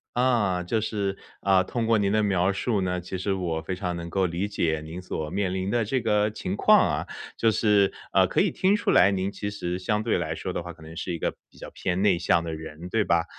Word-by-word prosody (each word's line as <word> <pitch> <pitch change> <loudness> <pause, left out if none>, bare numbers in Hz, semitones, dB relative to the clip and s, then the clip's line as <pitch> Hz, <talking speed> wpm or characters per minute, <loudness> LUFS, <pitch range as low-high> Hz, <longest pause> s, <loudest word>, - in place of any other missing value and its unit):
啊， 115 -8 +2
就 110 +6 0
是， 100 -3 -2 0.2
啊， 95 -1 +4
通 115 +5 -2
过 115 0 +3
您 100 -2 +1
的 110 +1 +2
描 95 -1 +2
述 105 +1 0
呢， 90 -1 -1
其 90 +2 -5
实 95 +2 -1
我 85 -4 -2
非 90 +4 -4
常 90 -2 -3
能 85 0 -6
够 95 +1 +1
理 90 +3 -2
解 80 -6 -1
您 80 +4 -7
所 80 -4 -4
面 95 0 -1
临 95 0 -2
的 120 +1 +1
这 130 +5 0
个 105 -2 +1
情 95 -2 -4
况 - - +6 0.2
啊。 - - -7 0.3
就 115 -1 +3
是， 105 -2 +3 0.2
呃， - - +5
可 - - 0
以 - - +4
听 195 +3 +2
出 230 - 0
来 100 - +6
您 95 0 -1
其 100 0 -5
实 90 -3 -3
相 105 +3 -1
对 115 - +1
来 80 -2 -2
说 90 +3 -5
的 - - -3
话 85 - -7
可 85 -2 -16
能 80 +1 -10
是 90 - -4
一 85 - -3
个 - - 0 0.2
比 - - -22
较 - - -9
偏 95 +1 -2
内 100 -4 +4
向 85 -1 +2
的 80 - -4
人， 80 +2 -8
对 110 +3 +1
吧？ 85 -3 +2
95 Hz, 275 characters per minute, -26 LUFS, 85-105 Hz, 0.3 s, 况